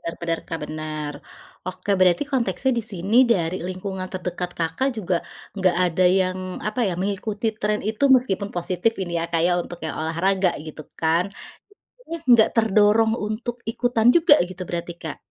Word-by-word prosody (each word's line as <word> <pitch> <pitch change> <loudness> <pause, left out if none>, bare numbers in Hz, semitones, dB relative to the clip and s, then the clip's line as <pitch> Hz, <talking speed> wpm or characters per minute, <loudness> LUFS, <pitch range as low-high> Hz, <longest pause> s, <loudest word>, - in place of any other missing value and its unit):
Bener 165 - -5
bener, 165 -1 -1
Kak, 165 - -3
bener. 155 -1 -5 0.6
Oke, 185 +2 -5
berarti 180 +6 +4
konteksnya 240 -1 +1
di - - -1
sini 195 +5 -1 0.2
dari 175 -2 -1
lingkungan 185 0 -5
terdekat 180 -1 -3
Kakak, 165 +11 0
juga 185 -3 0 0.4
enggak 185 -2 +2
ada 180 +1 +1 0.2
yang 185 0 -1 0.3
apa 215 +4 -3
ya? 180 - -2
Mengikuti 205 +3 -2
tren 210 0 0
itu 220 +5 -1
meskipun 200 -5 -1
positif 180 +5 0
ini 175 -2 -5
ya, - - -1
Kak, 165 -1 +2
ya 180 - +3
untuk 175 - -9
yang 155 - -4
olahraga 180 +3 +1
gitu 155 0 -8 0.2
kan? 165 +2 +2 0.7
Maksudnya, 420 -10 -7
enggak 235 -2 +7
terdorong 220 0 +4
untuk 220 +2 -4
ikutan 240 -1 +1
juga 325 -3 +6
gitu 185 +1 -11
berarti, 170 0 -4
Kak? 160 -3 -5
185 Hz, 165 wpm, -23 LUFS, 170-215 Hz, 0.7 s, enggak